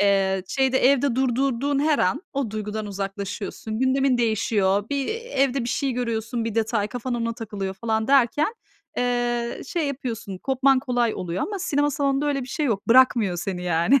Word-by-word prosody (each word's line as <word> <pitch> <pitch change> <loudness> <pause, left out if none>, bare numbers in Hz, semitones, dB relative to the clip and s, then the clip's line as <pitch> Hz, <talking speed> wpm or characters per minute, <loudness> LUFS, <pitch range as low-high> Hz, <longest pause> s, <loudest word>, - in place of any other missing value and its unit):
Eee, 195 -1 +2
şeyde 265 -1 +2
evde 270 -1 +3
durdurduğun 265 +2 +1
her 295 +1 +2
an 185 - +1
o 275 -5 -2
duygudan 215 0 -4
uzaklaşıyorsun, 200 +2 -5
gündemin 260 0 +2
değişiyor, 205 -3 +1
bir, 280 -1 -1
evde 275 - 0
bir - - -3
şey 270 +2 0
görüyorsun, 230 -1 -2
bir 225 -2 -3
detay, 225 -2 0
kafan 245 +1 -4
ona 230 -1 -1
takılıyor 205 -4 -5
falan 220 +2 -1
derken, 280 - +3 0.4
eee, 240 -1 -1
şey 325 +1 -1
yapıyorsun, 235 -8 -5
kopman 265 +3 +3
kolay 245 -3 0
oluyor 180 +1 -3
ama 405 -1 -3
sinema 290 -5 +1
salonunda 280 0 0
öyle 280 -2 0
bir 250 - -8
şey 300 +2 -1
yok. 210 -6 -2
Bırakmıyor 230 -6 +5
seni 180 0 -4
yani. 175 +10 +3
240 Hz, 165 wpm, -24 LUFS, 210-270 Hz, 0.4 s, Bırakmıyor